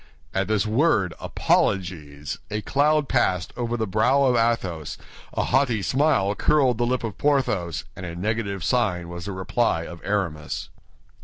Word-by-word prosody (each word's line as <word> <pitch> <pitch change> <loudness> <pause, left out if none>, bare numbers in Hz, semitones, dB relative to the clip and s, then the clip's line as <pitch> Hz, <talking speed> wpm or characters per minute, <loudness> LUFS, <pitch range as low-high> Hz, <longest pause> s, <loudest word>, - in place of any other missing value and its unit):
At 95 0 0
this 110 -1 +1
word 110 - +2
apologies, 75 -6 -1
a 105 0 -3
cloud 150 +1 +2
passed 95 -8 +1
over 120 -1 -2
the 110 - 0
brow 125 +7 +3
of 130 -2 +3
Athos, 115 -10 0 0.4
a - - 0
haughty 125 -5 +2
smile 130 - +2
curled 130 0 +2
the 120 - +2
lip 125 0 0
of 110 -3 -5
Porthos, 115 - +1
and - - -8
a 85 -2 -5
negative 100 0 -2
sign 90 -8 0
was 85 0 -7
the 100 - -4
reply 95 -1 0
of 85 0 -9
Aramis. 90 -7 -2
105 Hz, 155 wpm, -24 LUFS, 90-125 Hz, 0.4 s, brow